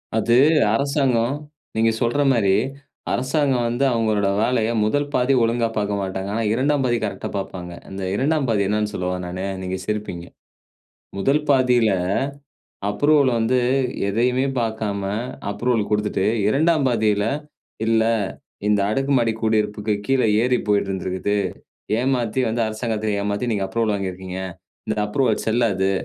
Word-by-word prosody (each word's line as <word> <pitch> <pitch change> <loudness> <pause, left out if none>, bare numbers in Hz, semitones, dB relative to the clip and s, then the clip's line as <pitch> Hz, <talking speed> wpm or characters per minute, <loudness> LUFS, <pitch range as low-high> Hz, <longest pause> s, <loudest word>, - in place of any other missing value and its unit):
அது 115 +1 +2 0.4
அரசாங்கம் 135 -2 +1 0.4
நீங்க 115 0 +3
சொல்ற 120 +5 +1
மாரி 105 -6 +3 0.6
அரசாங்கம் 130 -2 +1
வந்து 120 +3 -1
அவங்களோட 110 -3 +1
வேலைய 115 -1 +1 0.2
1 145 +6 0
பாதி 125 +2 +2
ஒழுங்கா 115 0 +1
பார்க்க 105 -1 0
மாட்டாங்க. 95 0 -4
ஆனா 115 - 0
2ஆம் 135 +3 +1
பாதி 120 -1 +2
கரெக்ட்டா 105 - -3
பார்ப்பாங்க. 90 -2 -6 0.2
அந்த 95 0 -6
2ஆம் 140 +4 +1
பாதி 105 -3 +2
என்னானு 105 +1 0
சொல்லவா 90 -1 -2
நானு? 90 +2 -4 0.2
நீங்க 95 0 -3
சிரிப்பீங்க. 105 -5 -4 0.9
1 140 +9 +2
பாதியில 125 -4 +4 1.0
அப்ரூவல் 145 +5 +3
வந்து 120 +3 +2 0.5
எதையுமே 125 +6 +1
பார்க்காம 110 -3 -2 0.5
அப்ரூவல் 115 -1 0
கொடுத்துட்டு, 105 -2 0 0.2
2ஆம் 155 +4 +3
பாதியில 105 -4 +2 0.6
"இல்ல 115 0 +3 0.6
இந்த 105 -1 +3
அடுக்கு 135 +6 0
மாடி 115 -1 +2
குடியிருப்புக்கு 105 -1 0
கீழே 135 -3 +3 0.2
ஏரி 125 0 +2
போயிட்டு 100 -1 +2
இருந்திருக்குது. 95 +2 -2 0.6
ஏமாத்தி 125 -2 0
வந்து 115 +1 -1
அரசாங்கத்த 110 -1 -2
ஏமாத்தி, 105 +4 -1
நீங்க 100 -3 0
அப்ரூவல் 110 +2 0
வாங்கியிருக்கீங்க. 95 -1 -5 0.5
இந்த 110 - -1
அப்ரூவல் 110 +1 +1
செல்லாது. 110 -4 +2
110 Hz, 130 wpm, -22 LUFS, 105-125 Hz, 1.0 s, பாதியில